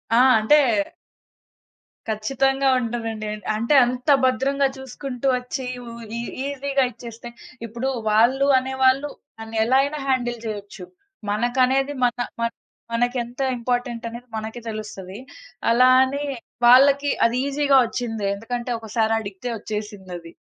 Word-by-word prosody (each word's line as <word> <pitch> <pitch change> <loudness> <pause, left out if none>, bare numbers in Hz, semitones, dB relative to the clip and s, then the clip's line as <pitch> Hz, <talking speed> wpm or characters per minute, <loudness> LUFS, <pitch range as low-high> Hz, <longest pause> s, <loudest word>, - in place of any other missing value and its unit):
ఆ! - - +5 0.2
అంటే 220 +8 +5 1.5
ఖచ్చితంగా 270 +5 +1
ఉంటదండి. 225 -2 -4 0.3
అంటే, 230 +7 +1
అంత 250 +3 -3 0.2
భద్రంగా 275 +2 +2
చూసుకుంటూ 265 0 -5
వచ్చి 250 +1 -5 0.2
వు 235 - -9 0.3
ఈ - - -2 0.2
ఈజీగా 280 -1 0
ఇచ్చేస్తే 235 0 -10 0.4
ఇప్పుడు 235 +4 -3 0.2
వాళ్ళు 250 +6 +4
అనేవాళ్ళు 265 +2 +1 0.3
దాన్ని 225 0 -6
ఎలా 255 +3 +3
అయినా 295 +1 -3
హ్యాండిల్ 245 -3 0
చేయొచ్చు. 205 -3 -6 0.5
మనకనేది 255 +5 +1
మన, 240 - +1 0.3
మన 230 - +1 0.4
మనకెంత 245 +1 -1 0.2
ఇంపార్టెంటనేది 240 0 -3
మనకి 220 +2 -6
తెలుస్తది. 205 -3 -7 0.5
అలా 250 +2 +5
అని, 280 +2 -2 0.4
వాళ్ళకి 280 +3 +6 0.2
అది 230 +2 +1
ఈజీగా 280 -1 +3
ఒచ్చింది. 225 -4 -4
ఎందుకంటే, 240 +3 -5
ఒకసారడిగతే 220 -1 -2
ఒచ్చేసిందది. 195 -6 -7
245 Hz, 110 wpm, -23 LUFS, 225-265 Hz, 1.5 s, వాళ్ళకి